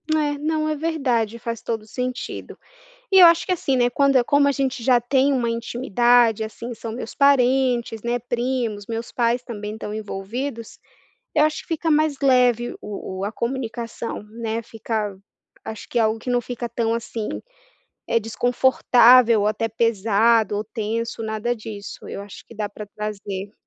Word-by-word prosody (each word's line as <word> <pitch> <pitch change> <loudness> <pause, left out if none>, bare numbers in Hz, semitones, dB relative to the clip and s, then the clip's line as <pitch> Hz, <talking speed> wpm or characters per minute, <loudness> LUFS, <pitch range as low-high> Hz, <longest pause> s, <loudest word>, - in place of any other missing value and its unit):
É, 300 -2 +1
não, 310 +1 0
é 310 - 0
verdade, 265 -8 -1
faz 230 -1 -5
todo 225 -2 -3
o - - -18
sentido. 250 +2 -5 0.5
E 385 - +7
eu 360 - +11
acho 335 0 +5
que - - -2
assim, 300 -7 0
né, 245 -1 +3
quando 275 +2 +2
é 255 - +5
como 285 +3 +3
a - - +4
gente 270 -3 -2
já 245 -1 +4
tem 270 +3 +2
uma 240 -3 0
intimidade, 235 -1 +2
assim 230 +2 -6
são 225 0 -6
meus 235 - -7
parentes, 255 -4 +2
né, 240 +1 0
primos, 240 -3 -2
meus 230 +1 -5
pais 240 0 +1
também 210 -3 -6
estão 215 -1 -6
envolvidos, 220 +4 -5 0.6
eu 300 - +5
acho 305 0 0
que - - -26
fica 325 0 -1
mais 305 -2 +2
leve 250 -3 +3
o 205 -1 -7 0.2
o - - -2
a 205 - -2
comunicação, 235 -2 -4
né, 225 +1 -4
fica 220 -2 -3
v 190 - -21 0.4
acho 220 - -7
que 240 - -1
é - - +4
algo 220 0 +1
que 245 +3 -5
não 245 0 +2
fica 240 0 -5
tão 230 -1 -1
assim, 230 -2 -4 0.8
eh, 230 - +3
desconfortável 245 0 +4
ou - - +1
até 215 +2 0
pesado 225 -1 +2
ou 210 - -2
tenso, 225 +1 -3
nada 220 +2 -2
disso, 215 -3 -9
eu - - -6
acho 200 -1 -11
que - - -14
dá 210 -1 -3
pra 210 +1 -9
trazer. 205 -1 -6
235 Hz, 180 wpm, -22 LUFS, 220-255 Hz, 0.8 s, eu